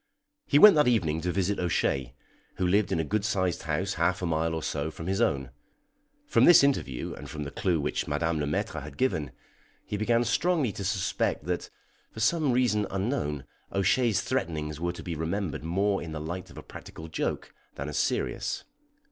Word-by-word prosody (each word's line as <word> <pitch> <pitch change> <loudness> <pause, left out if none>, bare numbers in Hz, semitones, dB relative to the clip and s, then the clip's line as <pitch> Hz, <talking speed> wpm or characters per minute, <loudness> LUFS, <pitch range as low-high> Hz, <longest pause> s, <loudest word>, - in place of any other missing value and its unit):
He 145 - +4
went 210 +6 +10
that 150 - +5
evening 80 -10 +2
to 90 +2 -1
visit 95 +2 0
O'Shea, 70 -7 0 0.4
who 90 - -1
lived 100 +2 +2
in - - +1
a - - +1
good 100 +7 -1
sized 95 -5 0
house 85 +5 -1
half 90 +2 +1
a - - +1
mile 80 0 0
or 80 - -4
so 75 +1 -2
from 80 +1 -8
his 95 +2 0
own. 65 -4 0 0.7
From - - +4
this 175 -5 +8
interview, 100 - 0
and - - -9
from 75 -1 -5
the 70 - -6
clue 90 -4 0
which 70 - -2
Madame 80 +2 0
Le 75 - -1
Maître 75 - -2
had 70 0 -10
given, 90 - 0 0.6
he 105 - -3
began 115 +3 +2
strongly 155 -1 +1
to 100 - -6
suspect 95 -5 -1
that, 90 0 -2 0.4
for - - -10
some 150 +5 +2
reason 115 -5 +2
unknown, 95 - -2 0.3
O'Shea's 100 +3 +2
threatenings 75 -2 -2
were 85 +1 -1
to 85 - -9
be 85 - -4
remembered 80 +2 -3
more 95 +4 +1
in 80 -2 -6
the 80 - -4
light 85 +4 -5
of - - -14
a - - -8
practical 80 - -10
joke 80 - -3 0.2
than 70 - -5
as 75 - -4
serious. - - -1
90 Hz, 195 wpm, -28 LUFS, 80-105 Hz, 0.7 s, went